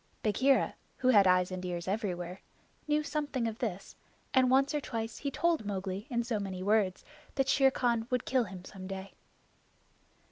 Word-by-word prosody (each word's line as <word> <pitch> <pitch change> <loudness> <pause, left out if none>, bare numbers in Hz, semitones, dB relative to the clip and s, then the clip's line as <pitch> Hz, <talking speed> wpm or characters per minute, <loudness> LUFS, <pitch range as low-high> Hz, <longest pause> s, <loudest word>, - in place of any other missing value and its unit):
Bagheera, 260 +6 +3 0.2
who 255 - +2
had 205 -6 +7
eyes 180 0 +3
and 185 0 -4
ears 175 -1 -4
everywhere, 185 -3 -3 0.5
knew 300 0 +2
something 290 -6 -2
of 225 0 -5
this, 195 -5 -4 0.4
and 260 -1 +5
once 270 +3 +4
or 295 - 0
twice 225 -3 -4
he 280 - -2
told 330 0 +1
Mowgli 195 +1 -4
in 235 -2 0
so 230 -2 -1
many 190 -2 -4
words 205 -2 +1 0.3
that 270 -1 +1
Shere 270 -1 +5
Khan 235 -3 0
would 250 -1 0
kill 255 -3 +2
him 185 -2 -9
some 185 -1 -9
day. 195 0 -6
220 Hz, 175 wpm, -31 LUFS, 190-260 Hz, 0.5 s, had